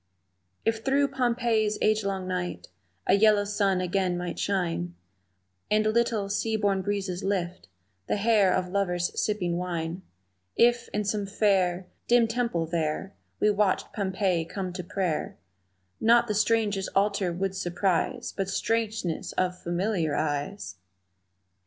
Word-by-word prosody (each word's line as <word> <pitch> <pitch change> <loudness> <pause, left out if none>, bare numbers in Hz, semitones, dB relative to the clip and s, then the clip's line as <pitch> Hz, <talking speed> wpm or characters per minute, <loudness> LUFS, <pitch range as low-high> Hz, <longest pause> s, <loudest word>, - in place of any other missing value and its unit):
If 225 0 0
through 275 +2 +2
Pompeii's 235 -5 +1
agelong 200 -3 0
night 180 -1 -3 0.4
A - - +3
yellow 210 0 +5
sun 200 -2 +1
again 180 0 0
might 175 0 -4
shine, 170 - -1 0.7
And 215 0 +3
little, 220 -2 +1
sea 220 +2 -1
born 200 -2 +1
breezes 195 -1 -2
lift 180 - -2 0.4
The - - +1
hair 205 -2 +4
of 185 -1 0
lovers 180 -3 0
sipping 180 -5 -1
wine, 175 -1 -3 0.5
If, 240 0 +3
in 210 - -1
some 205 0 -1
fair, 190 -3 +1 0.2
Dim 240 -1 +5
temple 225 -8 -1
there, 165 +3 -2 0.3
We 210 - +4
watched 205 -2 0
Pompeii 190 -4 0
come 185 +1 -5
to 180 0 -5
prayer 175 -2 -2 0.6
Not 235 +1 +5
the 210 - 0
strange 210 -1 +2 0.2
altar 200 -2 +2
would 190 +2 -2
surprise 190 +7 -1
But 195 -1 -2
strangeness 220 -5 -1
of 180 -1 0
familiar 175 -2 -1
eyes! 145 - -3
195 Hz, 130 wpm, -27 LUFS, 180-215 Hz, 0.7 s, yellow